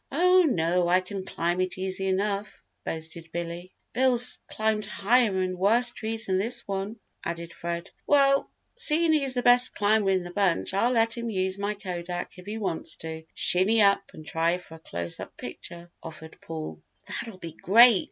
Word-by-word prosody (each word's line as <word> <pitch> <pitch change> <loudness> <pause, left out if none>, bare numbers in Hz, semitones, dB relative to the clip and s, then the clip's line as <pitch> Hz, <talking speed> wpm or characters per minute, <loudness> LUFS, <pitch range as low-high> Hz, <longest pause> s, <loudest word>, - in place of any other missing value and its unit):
"Oh, 365 +5 +5
no, 175 -3 +1
I 180 +1 +4
can 190 +1 -6
climb 175 0 -1
it 185 0 -2
easy 190 0 -2
enough," 200 +2 -2 0.2
boasted 165 0 -5
Billy. 170 +2 -5 0.2
"Bill's 250 0 +3
climbed 215 -1 -1
higher 210 -1 +2
and 185 -1 -4
worse 235 +6 +3
trees 225 -1 -2
than 190 -2 +1
this 235 +4 -1
one," 200 +3 -4 0.3
added 170 0 -5
Fred. 170 +2 -5 0.2
"Well, 275 -1 +4 0.3
seein' 335 -8 +3
he's 275 -4 +2
the 245 - 0
best 245 +1 +5
climber 205 -1 +2
in 190 -2 +1
the 175 - -8
bunch 190 -2 0
I'll 230 +6 +2
let 230 -1 +2
him 235 -1 -4
use 190 -1 -1
my 205 +1 -2
kodak 180 -2 -6
if 180 - -14
he 215 +2 -4
wants 165 -6 -3
to 160 0 -8
shinny 195 +5 +3
up 200 0 +3
and 155 - -11
try 165 +3 0
for 180 -2 -14
a 160 - -11
close 85 - -4
up - - -9
picture," 170 0 -9
offered 160 0 -11
Paul. 155 - -7 0.3
"That'll 225 -5 -4
be 165 -3 -8
great! 225 +5 +6
195 Hz, 180 wpm, -26 LUFS, 170-225 Hz, 0.3 s, great